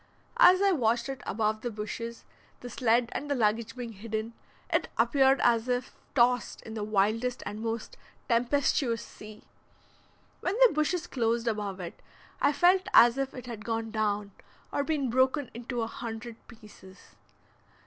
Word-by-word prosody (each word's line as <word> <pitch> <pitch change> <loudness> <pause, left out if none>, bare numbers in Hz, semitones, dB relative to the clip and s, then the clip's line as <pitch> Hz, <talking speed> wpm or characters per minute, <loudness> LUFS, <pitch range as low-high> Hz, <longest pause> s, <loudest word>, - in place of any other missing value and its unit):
As 385 -6 +7
I 395 - +4
watched 235 -5 +1
it 270 -1 -5
above 215 0 -1
the 240 - -3
bushes, 230 +2 -6 0.4
the 245 - -8
sled 240 -1 +2
and 290 - -5
the 285 - +1
luggage 225 0 0
being 245 -2 -6
hidden, 220 +2 -5 0.4
it - - +2
appeared 270 -1 +4
as 235 0 +3
if 250 0 -2 0.2
tossed 245 -1 +2
in 220 - -9
the 215 -2 -4
wildest 215 +4 0
and 210 +1 -5
most 225 0 -4 0.3
tempestuous 240 0 +1
sea. 215 0 -13 1.0
When 365 - -2
the 465 - +4
bushes 310 +3 0
closed 235 -3 -1
above 205 -4 -2
it 175 -2 -8 0.4
I - - +4
felt 360 +5 +3
as 240 +3 +7
if 270 0 -3
it 255 - -8
had 230 -4 -7
gone 225 -1 -3
down, 210 -2 -1 0.4
or 285 - 0
been 280 -5 -1
broken 260 +2 +1
into 240 0 -4
a - - -1
hundred 230 0 -7
pieces. 210 -5 -16
235 Hz, 160 wpm, -29 LUFS, 220-260 Hz, 1.0 s, As